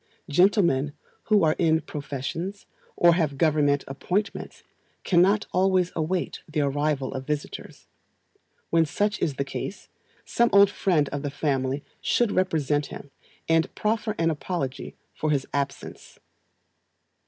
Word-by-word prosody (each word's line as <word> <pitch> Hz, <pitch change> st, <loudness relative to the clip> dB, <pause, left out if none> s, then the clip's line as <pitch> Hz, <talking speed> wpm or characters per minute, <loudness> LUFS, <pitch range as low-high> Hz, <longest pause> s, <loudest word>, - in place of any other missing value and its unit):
Gentlemen 150 Hz, -4 st, +3 dB, 0.3 s
who 210 Hz, -3 st, +4 dB
are 155 Hz, -1 st, +3 dB
in 160 Hz, -2 st, +3 dB
professions, 150 Hz, +7 st, -5 dB, 0.3 s
or 170 Hz, 0 st, +6 dB
have 155 Hz, -5 st, 0 dB
Government 145 Hz, -2 st, +2 dB
appointments, 185 Hz, +9 st, -3 dB, 0.4 s
cannot 190 Hz, +4 st, +3 dB
always 185 Hz, -1 st, +2 dB
await 170 Hz, +2 st, -2 dB
the 155 Hz, -1 st, 0 dB
arrival 145 Hz, -1 st, 0 dB
of 130 Hz, 0 st, -6 dB
visitors; 150 Hz, -1 st, -5 dB, 0.9 s
when 165 Hz, 0 st, +4 dB
such 205 Hz, +6 st, -1 dB
is 145 Hz, -, 0 dB
the 140 Hz, -, -2 dB
case, 190 Hz, +7 st, -6 dB, 0.4 s
some 235 Hz, 0 st, +2 dB
old 200 Hz, 0 st, +7 dB
friend 165 Hz, -9 st, +1 dB
of 145 Hz, -, -4 dB
the 145 Hz, -, -3 dB
family 135 Hz, -1 st, -1 dB, 0.2 s
should 240 Hz, -4 st, +2 dB
represent 150 Hz, -6 st, +1 dB
him, 140 Hz, -, -10 dB, 0.4 s
and 165 Hz, 0 st, +1 dB
proffer 215 Hz, 0 st, -1 dB
an 165 Hz, 0 st, +2 dB
apology 145 Hz, -4 st, -4 dB, 0.2 s
for 155 Hz, -, -2 dB
his 140 Hz, -3 st, +1 dB
absence. 140 Hz, -1 st, -4 dB
160 Hz, 130 wpm, -25 LUFS, 145-185 Hz, 0.9 s, old